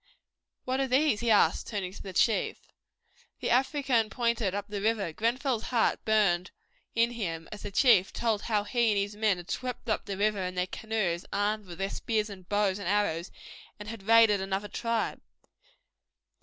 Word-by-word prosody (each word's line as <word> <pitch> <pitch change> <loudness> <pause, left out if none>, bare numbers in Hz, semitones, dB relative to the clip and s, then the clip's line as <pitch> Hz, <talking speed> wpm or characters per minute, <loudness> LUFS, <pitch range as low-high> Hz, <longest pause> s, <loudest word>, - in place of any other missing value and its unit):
"What 260 +1 -1
are 270 - +1
these?" 260 -3 +2
he 235 - -1
asked, 205 -6 +3
turning 195 -4 -4
to - - -10
the 195 - -7
chief. 215 +4 +1 0.8
The - - -2
African 260 -3 +2
pointed 235 -5 0
up 205 0 -4
the 205 -1 -4
river. 210 -6 0
Grenfell's 235 - -1
heart 235 -3 +1
burned 195 -5 +2 0.5
in 230 +1 +3
him, 165 -9 -4
as 210 - -8
the - - -5
chief 200 -3 +4
told 225 -3 0
how 210 -3 0
he 235 +2 +1
and - - -1
his 200 +1 -1
men 210 -3 +2
had 175 0 -8
swept 250 -2 -4
up 215 - 0
the 195 -2 -4
river 205 0 +1
in 180 0 -3
their 180 0 +1
canoes 190 -3 -2
armed 210 0 -1
with 175 -1 -9
their 195 +1 -2
spears 215 -2 -1
and 185 -2 -12
bows 205 -1 +1
and 200 - -5
arrows 185 -4 0 0.5
and 210 0 -7
had 225 -2 -7
raided 225 -3 +6
another 195 +1 -2
tribe. 230 +1 -2
210 Hz, 185 wpm, -29 LUFS, 195-230 Hz, 0.8 s, raided